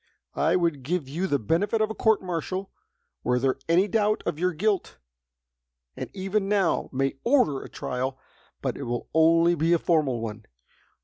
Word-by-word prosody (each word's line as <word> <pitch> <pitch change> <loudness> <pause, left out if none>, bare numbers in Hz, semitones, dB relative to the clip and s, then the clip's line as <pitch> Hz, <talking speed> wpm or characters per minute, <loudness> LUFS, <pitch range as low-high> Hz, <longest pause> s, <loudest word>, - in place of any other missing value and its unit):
I - - +2
would 170 -6 +1
give 155 +2 -2
you 170 +8 -2
the 145 - +2
benefit 175 - 0
of 215 0 +1
a - - -3
court 220 -2 +2
martial, 185 +2 -3 0.5
were 125 0 +2
there 130 +1 +1
any 180 +4 +4
doubt 210 +1 +1
of 150 - -2
your 180 +1 +2
guilt, 195 +3 -1 1.0
and - - -6
even 195 +1 -1
now 200 -4 +1
may 135 0 -1
order 235 - +3
a - - -10
trial, 130 +1 -3 0.5
but - - -1
it 140 - -5
will 120 0 -4
only 165 +2 +5
be 165 +1 +2
a - - +5
formal 155 -8 +1
one. 110 -1 -6
170 Hz, 175 wpm, -26 LUFS, 135-195 Hz, 1.0 s, only